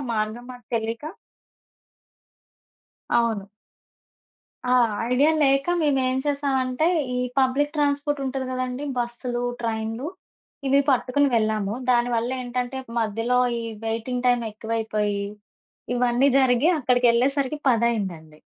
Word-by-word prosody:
మార్గం 215 Hz, +3 st, -2 dB
మాకు 245 Hz, -2 st, -13 dB
తెలియక 230 Hz, +5 st, -2 dB, 2.0 s
అవును. 225 Hz, -4 st, +1 dB, 1.2 s
ఆ! -, -, +5 dB, 0.4 s
ఐడియా 285 Hz, +5 st, +4 dB
లేక 275 Hz, +1 st, +3 dB
మేమేం 265 Hz, -4 st, +1 dB
చేసామంటే 275 Hz, -1 st, 0 dB, 0.3 s
ఈ -, -, 0 dB, 0.2 s
పబ్లిక్ 275 Hz, +3 st, +2 dB
ట్రాన్‌పోర్ట్ 290 Hz, 0 st, 0 dB
ఉంటది 260 Hz, 0 st, -3 dB
కదండీ! 255 Hz, +2 st, -3 dB
బస్సులు, 240 Hz, 0 st, -3 dB, 0.2 s
ట్రైన్లు 225 Hz, +3 st, -3 dB, 0.6 s
ఇవి 275 Hz, +1 st, +5 dB
పట్టుకొని 270 Hz, +2 st, +2 dB
వెళ్ళాము. 215 Hz, -2 st, 0 dB, 0.2 s
దాని 240 Hz, 0 st, +3 dB
వల్ల 235 Hz, +2 st, -1 dB
ఏంటంటే 250 Hz, +1 st, -3 dB, 0.2 s
మధ్యలో 225 Hz, +3 st, 0 dB, 0.2 s
ఈ -, -, -4 dB, 0.2 s
వెయిటింగ్ 235 Hz, +3 st, -2 dB
టైం 245 Hz, -1 st, +4 dB
ఎక్కువయిపోయి 215 Hz, -2 st, -2 dB, 0.7 s
ఇవన్నీ 245 Hz, +2 st, +3 dB
జరిగి 260 Hz, +5 st, +4 dB
అక్కడికెళ్ళేసరికి 255 Hz, +3 st, +2 dB
పదయిందండి. 195 Hz, -10 st, -1 dB
245 Hz, 100 wpm, -24 LUFS, 225-265 Hz, 2.0 s, ఆ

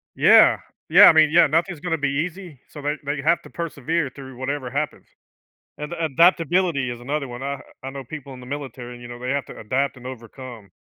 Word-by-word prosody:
Yeah. -, -, +6 dB, 0.3 s
Yeah, -, -, +9 dB
I -, -, +9 dB
mean, 155 Hz, -1 st, +5 dB
yeah, 165 Hz, 0 st, +6 dB
nothing's 165 Hz, +3 st, 0 dB
gonna 165 Hz, 0 st, -2 dB
be 145 Hz, -2 st, 0 dB, 0.2 s
easy, 180 Hz, -5 st, -10 dB
so 145 Hz, -, -10 dB
they 145 Hz, +1 st, -2 dB
they 145 Hz, 0 st, -2 dB
have 165 Hz, +4 st, +2 dB
to -, -, -13 dB
persevere 165 Hz, -2 st, -2 dB
through 130 Hz, -2 st, -11 dB
whatever 130 Hz, 0 st, -3 dB
happens. 145 Hz, +4 st, -4 dB, 0.7 s
And 150 Hz, +2 st, -6 dB
adaptability 165 Hz, -2 st, +2 dB
is 120 Hz, -1 st, -7 dB
another 140 Hz, +2 st, -3 dB
one, 120 Hz, 0 st, -8 dB
I 140 Hz, 0 st, -4 dB, 0.2 s
I 135 Hz, -, -4 dB
know 135 Hz, 0 st, -7 dB
people 140 Hz, 0 st, -9 dB
in 125 Hz, -, -11 dB
the 125 Hz, -, -12 dB
military, 125 Hz, -3 st, -7 dB
you 120 Hz, -, -9 dB
know, 120 Hz, 0 st, -9 dB
they 125 Hz, +1 st, -3 dB
have 140 Hz, -1 st, -1 dB
to -, -, -11 dB
adapt 130 Hz, +6 st, -1 dB
and 125 Hz, 0 st, -11 dB
overcome. 120 Hz, -3 st, -10 dB
140 Hz, 210 wpm, -23 LUFS, 130-160 Hz, 0.7 s, Yeah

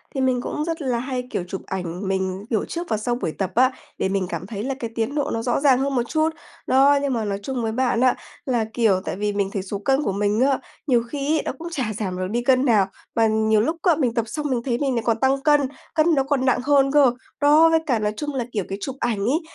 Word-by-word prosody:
thì 270 Hz, -, 0 dB
mình 255 Hz, -2 st, +1 dB
cũng 300 Hz, +4 st, -3 dB
rất 330 Hz, -1 st, -3 dB
là 250 Hz, -4 st, 0 dB
hay, 250 Hz, -1 st, -4 dB
kiểu, 180 Hz, -, -2 dB
chụp 190 Hz, 0 st, -5 dB
ảnh 180 Hz, 0 st, -4 dB
mình, 190 Hz, 0 st, -2 dB
kiểu, 220 Hz, -4 st, 0 dB
trước 345 Hz, +1 st, -5 dB
và 220 Hz, -, +1 dB
sau 240 Hz, +3 st, -1 dB
buổi 165 Hz, -, -3 dB
tập 190 Hz, +2 st, -3 dB
á, 255 Hz, +2 st, +5 dB, 0.3 s
để -, -, 0 dB
mình 195 Hz, -1 st, 0 dB
cảm 170 Hz, +2 st, -5 dB
thấy 205 Hz, -1 st, -5 dB
là 270 Hz, -, -2 dB
cái 230 Hz, -4 st, -4 dB
tiến 230 Hz, +5 st, -1 dB
độ 290 Hz, -, 0 dB
nó 225 Hz, -, -1 dB
rõ 245 Hz, -, 0 dB
ràng 275 Hz, -3 st, +4 dB
hơn 275 Hz, 0 st, -1 dB
một 245 Hz, -, +2 dB
chút. 315 Hz, +3 st, +1 dB, 0.4 s
Đó, 280 Hz, +2 st, +5 dB
nhưng 280 Hz, -2 st, 0 dB
mà 225 Hz, -2 st, -1 dB
nói 200 Hz, -1 st, -2 dB
chung 255 Hz, -1 st, -3 dB
với 220 Hz, -, -1 dB
bạn 245 Hz, 0 st, +1 dB
á, 255 Hz, -1 st, +4 dB, 0.3 s
là, 240 Hz, -4 st, +1 dB
kiểu, 210 Hz, -6 st, +2 dB
tại -, -, -3 dB
vì 205 Hz, +1 st, -1 dB
mình 200 Hz, -1 st, 0 dB
thấy 195 Hz, -, -2 dB
số 200 Hz, +1 st, -5 dB
cân 270 Hz, +7 st, +1 dB
của -, -, 0 dB
mình 205 Hz, +2 st, 0 dB
á, 270 Hz, 0 st, +3 dB, 0.3 s
nhiều 240 Hz, -4 st, +3 dB
khi 290 Hz, +4 st, -1 dB
ấy -, -, 0 dB
nó -, -, -1 dB
cũng 335 Hz, -, -6 dB
chả 265 Hz, -8 st, -1 dB
giảm 185 Hz, -4 st, -3 dB
được 185 Hz, -, -2 dB
đi 240 Hz, +2 st, 0 dB
cân 255 Hz, +1 st, +3 dB
nào, 210 Hz, -7 st, +4 dB, 0.3 s
mà 225 Hz, -1 st, +4 dB
nhiều 220 Hz, 0 st, +2 dB
lúc 320 Hz, +9 st, -1 dB
á, 345 Hz, -3 st, +4 dB
mình 260 Hz, -6 st, 0 dB
tập 230 Hz, -2 st, 0 dB
xong 300 Hz, +6 st, -4 dB
mình 250 Hz, -3 st, 0 dB
thấy 240 Hz, -3 st, 0 dB
mình 270 Hz, -1 st, 0 dB
lại 230 Hz, -, -1 dB
còn 230 Hz, -1 st, +1 dB
tăng 270 Hz, +1 st, +2 dB
cân, 295 Hz, -1 st, +5 dB, 0.3 s
cân 320 Hz, +1 st, +4 dB
nó 270 Hz, -, +2 dB
còn 270 Hz, -1 st, 0 dB
nặng 260 Hz, -, +3 dB
hơn 275 Hz, 0 st, +3 dB
cơ. 285 Hz, -3 st, +5 dB, 0.3 s
Đó, 305 Hz, +3 st, +6 dB
với 325 Hz, 0 st, +4 dB
cả 250 Hz, -7 st, +1 dB
nói 210 Hz, 0 st, -1 dB
chung 295 Hz, -1 st, -3 dB
là, 250 Hz, -3 st, -1 dB
kiểu, 205 Hz, -4 st, -1 dB
cái 195 Hz, -, -3 dB
chụp 265 Hz, +3 st, -4 dB
ảnh 235 Hz, -4 st, -1 dB
ấy, 255 Hz, -, +1 dB
245 Hz, 280 wpm, -23 LUFS, 210-275 Hz, 0.4 s, Đó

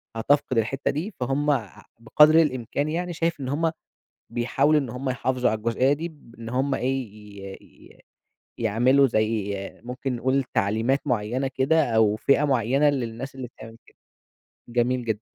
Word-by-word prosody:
هتفقد 130 Hz, +1 st, +1 dB
الحتة 125 Hz, +5 st, 0 dB
دي، 175 Hz, +8 st, -4 dB
فهُم 135 Hz, +4 st, 0 dB
أ 120 Hz, -8 st, -1 dB, 0.3 s
بقدر 150 Hz, +7 st, +5 dB
الإمكان 140 Hz, +1 st, -1 dB
يعني، 175 Hz, +2 st, -2 dB
شايف 165 Hz, -1 st, -1 dB
إن 130 Hz, -1 st, -4 dB
هُم 160 Hz, +3 st, 0 dB, 0.6 s
بيحاولوا 135 Hz, +5 st, +2 dB
إن 130 Hz, -5 st, -5 dB
هُم 130 Hz, +2 st, -3 dB
يحافظوا 125 Hz, -1 st, 0 dB
على 110 Hz, -, -1 dB
الجزئية 115 Hz, +5 st, +1 dB
دي، 160 Hz, +4 st, -3 dB
بإن 115 Hz, -5 st, -12 dB
هُم 135 Hz, +3 st, 0 dB
إيه، 130 Hz, -1 st, -1 dB, 0.4 s
ي 95 Hz, 0 st, -8 dB
ي -, -, -20 dB, 0.6 s
يعملوا 120 Hz, +5 st, +3 dB
زي 110 Hz, -3 st, 0 dB, 0.3 s
ممكن 125 Hz, +1 st, -4 dB
نقول 130 Hz, +3 st, +1 dB
تعليمات 110 Hz, +7 st, +1 dB
معيّنة 125 Hz, +2 st, -1 dB
كده 145 Hz, +4 st, +2 dB
أو 110 Hz, -1 st, +4 dB
فِئة 140 Hz, +6 st, +2 dB
معيّنة 135 Hz, +1 st, +2 dB
للناس 130 Hz, -1 st, -3 dB
اللي 130 Hz, -2 st, -6 dB
بتعمل 115 Hz, -1 st, -13 dB
كده. -, -, -23 dB, 0.7 s
جميل 120 Hz, +1 st, 0 dB
جدًا. 110 Hz, -2 st, -2 dB
130 Hz, 155 wpm, -24 LUFS, 115-140 Hz, 0.7 s, بقدر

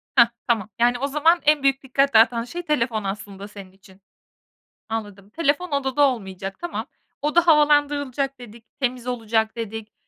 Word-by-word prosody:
Heh, 235 Hz, -2 st, +7 dB, 0.2 s
tamam. 220 Hz, -4 st, 0 dB
Yani 245 Hz, +1 st, +3 dB
o 280 Hz, -, -1 dB
zaman 320 Hz, +4 st, +3 dB
en 300 Hz, -1 st, +3 dB
büyük 275 Hz, 0 st, +2 dB
dikkat 275 Hz, +1 st, +1 dB
dağıtan 230 Hz, +1 st, +5 dB
şey 345 Hz, +8 st, -6 dB
telefon 235 Hz, -8 st, 0 dB
aslında 195 Hz, 0 st, -6 dB
senin 200 Hz, -3 st, -12 dB
için. 190 Hz, 0 st, -21 dB, 0.9 s
Anladım, 205 Hz, -3 st, -6 dB
telefon 320 Hz, +5 st, -1 dB
odada 280 Hz, 0 st, 0 dB
olmayacak 195 Hz, -5 st, -6 dB
tamam. 345 Hz, -, -5 dB, 0.3 s
Oda 335 Hz, +4 st, +2 dB
havalandırılacak 290 Hz, -3 st, +2 dB
dedik, 230 Hz, -1 st, -13 dB
temiz 250 Hz, -1 st, -2 dB
olacak 225 Hz, -2 st, -1 dB
dedik. 225 Hz, -1 st, -6 dB
245 Hz, 150 wpm, -23 LUFS, 215-285 Hz, 0.9 s, Heh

